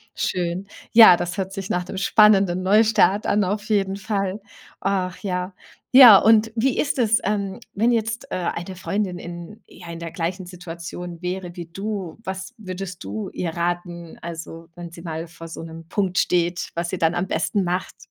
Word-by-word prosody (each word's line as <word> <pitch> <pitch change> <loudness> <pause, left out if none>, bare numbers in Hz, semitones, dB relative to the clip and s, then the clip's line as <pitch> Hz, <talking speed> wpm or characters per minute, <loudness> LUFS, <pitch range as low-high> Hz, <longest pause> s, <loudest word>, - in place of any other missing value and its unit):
Schön. 180 +2 -2 0.2
Ja, 225 -6 +9
das 175 +2 -4
hört 190 0 -3
sich 195 -2 -6
nach 180 0 -1
dem 185 - -7
spannenden 195 -2 +4
Neustart 210 +1 +3
an 205 -1 +2
auf 205 +4 -3
jeden 195 -2 +1
Fall. 195 0 -3 0.4
Ach, 185 -2 -1
ja. 185 -1 -3 0.4
Ja, 245 -6 +11
und 220 +1 +4
wie 255 +3 +1
ist 280 -3 0
es, 225 -1 +3
ähm, 200 -1 -2
wenn 230 +4 +2
jetzt, 225 +1 -2
äh, - - -3
eine 175 +1 -4
Freundin 190 0 -2
in 175 +4 -9
ja, 175 -1 -13
in 170 0 -7
der 165 -1 -6
gleichen 180 +2 -3
Situation 175 0 -8
wäre 180 0 -4
wie 170 -2 -7
du, 195 -1 -5
was 190 +2 -5
würdest 185 -3 -7
du 105 +2 -5
ihr 170 -2 -3
raten? 175 0 -4
Also, 165 0 -8
wenn 175 -1 -8
sie 170 - -11
mal 165 -1 -5
vor 165 0 -11
so 165 - -8
'nem 165 0 -10
Punkt 185 -1 -1
steht, 175 0 +1
was 170 0 -2
sie 185 - -3
dann 165 0 +1
am 185 +2 -1
besten 190 +4 0
macht? 180 +1 -3
185 Hz, 180 wpm, -22 LUFS, 170-200 Hz, 0.4 s, Ja